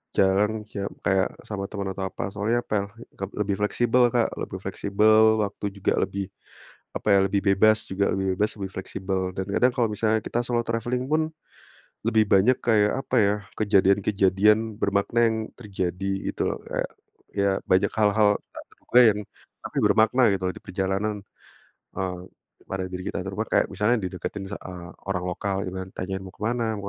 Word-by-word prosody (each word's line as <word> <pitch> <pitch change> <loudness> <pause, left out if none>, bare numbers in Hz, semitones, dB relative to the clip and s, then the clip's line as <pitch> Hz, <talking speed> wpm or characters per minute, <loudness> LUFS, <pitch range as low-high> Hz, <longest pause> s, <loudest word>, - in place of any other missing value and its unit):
jalan 100 +2 +3 0.2
kayak 100 -1 -3
kayak 95 -1 +2 0.2
sama 100 -2 -3
teman 100 -2 -4
atau 95 0 -3
apa, 95 - -7
soalnya 105 +4 0
pe 105 - -1 0.6
lebih 100 -1 0
fleksibel, 120 +4 +3
Kak, 120 -2 +3
lebih - - -5
fleksibel 110 +2 +3
waktu 100 0 -5
juga, 100 - 0
lebih 100 0 -3 0.7
apa - - -5
ya, 100 - +6
lebih 100 +1 0
bebas 110 +3 +5
juga, 100 +1 -1
lebih 95 0 -1
bebas, 105 +1 +3
lebih 95 -2 -5
fleksibel. 95 0 -3 0.2
Dan 95 - -2
kadang 125 +5 +3
kalau 120 -3 +2
misalnya 110 +1 +1
kita 120 - -2
solo 120 -1 0
traveling 120 +2 -2
pun 155 +1 +3 0.8
lebih 110 -1 +3
banyak 105 +7 +5
kayak, 105 -3 +4
apa - - -4
ya, 100 0 +3 0.3
kejadian-kejadian 100 +1 +3
bermakna 100 +3 +1
yang 110 - -1 0.2
terjadi, 95 -4 -4 0.2
gitu - - -1
loh. - - -3
Kayak - - -3 0.5
ya 100 0 +3 0.2
banyak 95 +2 +3
hal-hal 105 -1 +3 0.2
tak - - -8
terduga 125 - +3
yang 105 -1 +1 0.4
tapi - - -8
bermakna 110 +4 +4
gitu 95 -1 -2
loh - - -3
di - - -9
perjalanan, 95 +2 -2 0.7
eee, 90 -2 -3 0.5
pada 95 -1 -3
diri 90 0 -6
kita. - - -3 0.3
Kayak - - +4
misalnya 105 +5 +2
dideketin 95 +2 -5
sa - - -4
eee, 90 -2 -9 0.2
orang 90 -2 -1
lokal 100 +2 -2
gitu 90 - -5
kan, 95 - -8
tanyain 95 +1 -4
"mau 95 - -9
ke - - -23
mana, 120 +1 0
mau 100 - -7
100 Hz, 170 wpm, -25 LUFS, 95-110 Hz, 0.8 s, ya